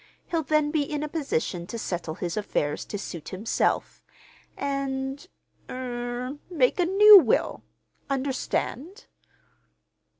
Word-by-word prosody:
He'll 335 -2 +1
then 305 0 +1
be 310 -1 +1
in 295 +1 -3
a - - -2
position 185 - -2
to 230 - -5
settle 175 -6 -4
his 175 -2 -4
affairs 150 -8 -2
to 205 - -5
suit 170 -5 -7
himself, 200 +4 -1 0.5
and—er—make 275 +2 -3 1.5
a 355 - +4
new 410 +2 +10
will. 265 -10 +1 0.5
Understand?" 275 - -2
275 Hz, 105 wpm, -26 LUFS, 205-310 Hz, 1.5 s, new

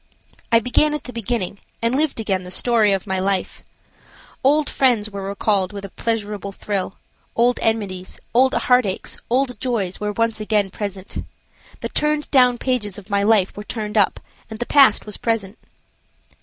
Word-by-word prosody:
I 230 - +6
began 295 +6 +2
at 300 - -5
the 250 - -9
beginning, 225 -4 -3 0.2
and 230 +1 0
lived 295 -2 0
again 195 -4 -1
the 180 - -9
story 220 +2 +4
of 195 -2 0
my 190 -2 -1
life. 190 0 -1 0.8
Old 290 +3 +3
friends 230 -6 +2
were 200 -1 -5
recalled 200 -1 0
with 200 -1 -6
a - - -8
pleasurable 210 -2 -3
thrill; 195 -1 -3 0.4
old 240 +1 +3
enmities, 200 -5 -2
old 260 +2 +4
heartaches, 250 -7 +1
old 250 -2 +1
joys 215 -8 -2
were 210 0 -2
once 230 0 0
again 210 -2 +1
present. 200 -2 -5 0.6
The - - -3
turned 300 0 -1
down 250 -3 +5
pages 225 -6 -2
of 205 0 -12
my 200 0 +2
life 205 -2 +3
were 205 - -6
turned 215 -1 -5
up, 205 -3 +3 0.3
and 220 - -7
the 240 - -3
past 270 -6 +5
was 210 -2 -4
present. 225 -3 -2
215 Hz, 170 wpm, -21 LUFS, 200-245 Hz, 0.8 s, I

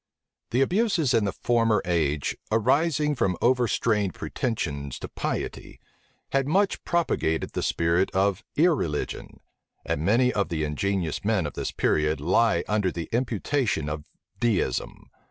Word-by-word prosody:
The 125 - +1
abuses 175 - +2
in 110 - +3
the 100 - 0
former 115 -1 +2
age, 75 -5 0 0.2
arising 150 +7 +2
from 95 -9 0
overstrained 115 -5 +1
pretensions 70 - -3
to - - -6
piety, - - -4 0.5
had 135 0 +1
much 195 +6 +1
propagated 160 - 0
the - - -3
spirit 85 +3 +1
of 95 +2 +1
irreligion; 145 - 0 0.4
and 70 - -1
many 120 +8 +3
of 100 - 0
the 80 -2 -1
ingenious 85 +2 -1
men - - +1
of - - -4
this - - -3
period 75 -1 +1
lie 95 +9 +2
under 105 -3 +1
the 85 -1 -5
imputation 120 - 0
of 75 0 -4 0.4
Deism. 115 -6 -1
105 Hz, 135 wpm, -26 LUFS, 85-130 Hz, 0.5 s, in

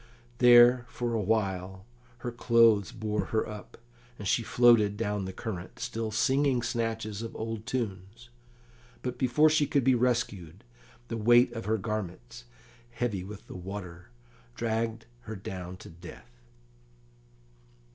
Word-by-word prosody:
There 120 0 +7
for 120 -1 -3
awhile 95 -3 -1 0.4
her 120 - -2
clothes 115 -3 +4
bore 110 -2 -2
her 110 - -1
up, 105 -1 -10 0.4
and 100 - -6
she 120 - +2
floated 115 -3 +4
down 105 -3 -2
the 95 - -5
current, 95 -4 -7
still 115 -2 -3
singing 130 +3 +1
snatches 115 -3 -2
of 115 - -7
old 110 -1 -5
tunes; 115 0 -5 0.7
but 125 -1 -4
before 130 +4 +4
she 155 -2 +3
could 140 - +1
be 130 +1 +4
rescued, 120 -8 -1 0.5
the - - -3
weight 120 +2 +5
of 115 -1 -6
her 110 +1 +1
garments, 95 - -5 0.4
heavy 115 -6 -3
with 100 +1 -10
the - - -10
water, 90 -3 -8 0.5
dragged 115 0 -2 0.2
her 110 - -6
down 90 -2 -7
to - - -12
death. 95 +8 -14
110 Hz, 135 wpm, -29 LUFS, 100-120 Hz, 0.7 s, There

